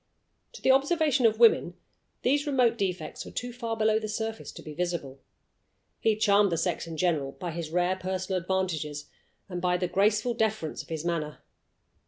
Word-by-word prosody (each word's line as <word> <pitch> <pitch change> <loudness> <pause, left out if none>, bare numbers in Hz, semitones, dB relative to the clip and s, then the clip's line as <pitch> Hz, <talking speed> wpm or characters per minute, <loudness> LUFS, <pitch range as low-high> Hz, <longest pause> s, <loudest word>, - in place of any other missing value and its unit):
To - - -12
the 265 - +6
observation 280 -2 +3
of 220 -1 0
women 220 -6 +5 0.5
these 285 +3 +2
remote 250 -5 +3
defects 185 -7 -3
were - - -9
too 245 0 -5
far 230 -2 -4
below 220 0 +3
the 215 - -4
surface 220 +1 -4
to - - -10
be 155 - -8
visible. 165 -5 -3 0.8
He 220 -1 +2
charmed 205 -2 +4
the 165 - 0
sex 170 0 -1
in 165 -1 -6
general 150 -6 0
by 175 -2 -5
his 165 -1 -5
rare 180 +2 +1
personal 185 0 -2
advantages, 160 -6 -2 0.4
and 180 -2 -5
by 180 0 +2
the 180 0 -1
graceful 210 +6 +2
deference 220 -8 -1
of - - -17
his 160 0 -4
manner. 155 -3 -3
190 Hz, 180 wpm, -28 LUFS, 170-225 Hz, 0.8 s, the